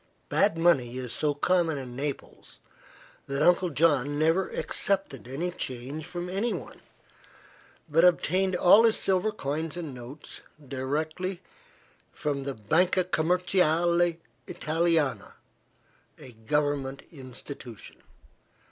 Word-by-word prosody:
Bad 165 - +2
money 135 -8 +2
is 125 -2 -4
so 145 +3 0
common 165 0 +1
in 125 -3 -7
Naples 140 +1 -6 0.7
that 140 +1 0
Uncle 180 +1 +4
John 145 -2 +2
never 165 +5 +2
accepted 195 - -1
any 160 +8 -3
change 140 0 -5
from 175 0 -5
anyone, 195 - -3 1.1
but 160 +2 +3
obtained 185 +1 +3
all 180 +5 +7
his 225 -1 +4
silver 190 +2 +1
coins 160 -2 -4
and 160 -6 -5
notes 125 +4 -8 0.3
directly 155 +8 -3 0.7
from 140 -2 -3
the 140 -1 -3
Banca 175 - +2
Commerciale 175 -1 +2 0.3
Italiana, 160 -2 0 0.8
a 130 - -12
government 140 +3 -1
institution. 130 -4 -9
155 Hz, 105 wpm, -27 LUFS, 135-175 Hz, 1.1 s, all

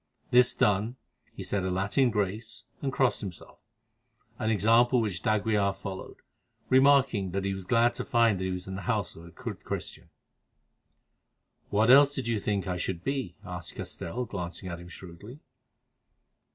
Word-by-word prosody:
This 125 0 +5
done, 105 +4 +1 0.4
he - - -6
said 100 -2 -1
a 95 - -1
Latin 100 +8 +2
grace 105 +1 -3 0.2
and 135 - -1
crossed 130 -2 +1
himself, 95 -6 -9 0.8
an 110 -2 0
example 115 +4 +4
which 100 -7 -2
d'Aguilar 105 -2 +1
followed, 95 -1 -7 0.5
remarking 130 -8 +4
that 100 0 -1
he 100 - 0
was 95 -1 -7
glad 120 +2 +3
to - - -4
find 115 -5 +3
that 95 - -2
he - - -1
was 90 0 -4
in 95 - -5
the 95 - -5
house 105 -7 -1
of 80 - -12
a - - -11
good - - -8
Christian. - - -6 1.6
"What 110 +4 +4
else 140 +1 +7
did 130 -4 -3
you 115 -2 0
think 100 -2 -1
that 95 - -2
I 90 - -2
should 85 0 -3
be?" 130 -10 -2
asked - - -7
Castell, 125 +9 -5
glancing 90 -3 -6
at 85 -1 -6
him 85 - -11
shrewdly. 95 - -11
105 Hz, 170 wpm, -28 LUFS, 95-120 Hz, 1.6 s, else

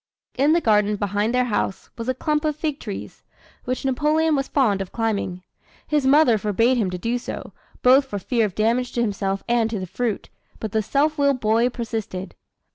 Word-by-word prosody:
In 280 +4 +3
the 340 - +3
garden 210 -3 +3
behind 205 +2 -1
their 250 0 +2
house 205 -4 -2
was 230 +1 -5
a 255 - 0
clump 300 +3 0
of 305 -1 0
fig 305 -1 -3
trees, 205 -4 -7 0.4
which 255 +1 -3
Napoleon 300 +4 +2
was 275 -1 -1
fond 215 -9 +2
of 190 - -6
climbing. 200 -5 -2 0.4
His 295 -3 +1
mother 265 -6 +5
forbade 225 +5 +2
him 210 -6 +1
to 180 - -4
do 235 +6 -1
so, - - -7 0.3
both 265 +2 +6
for 205 -6 -5
fear 230 +4 0
of 190 - -11
damage 235 +3 +1
to 240 - 0
himself 195 -3 -1
and 235 -2 +2
to 225 - -3
the 185 - -4
fruit, 225 +3 -3 0.3
but 220 - -4
the 220 - +1
self 295 +7 0
willed 280 -2 +3
boy 225 +2 +2
persisted. 220 -6 -5
235 Hz, 200 wpm, -23 LUFS, 210-270 Hz, 0.4 s, both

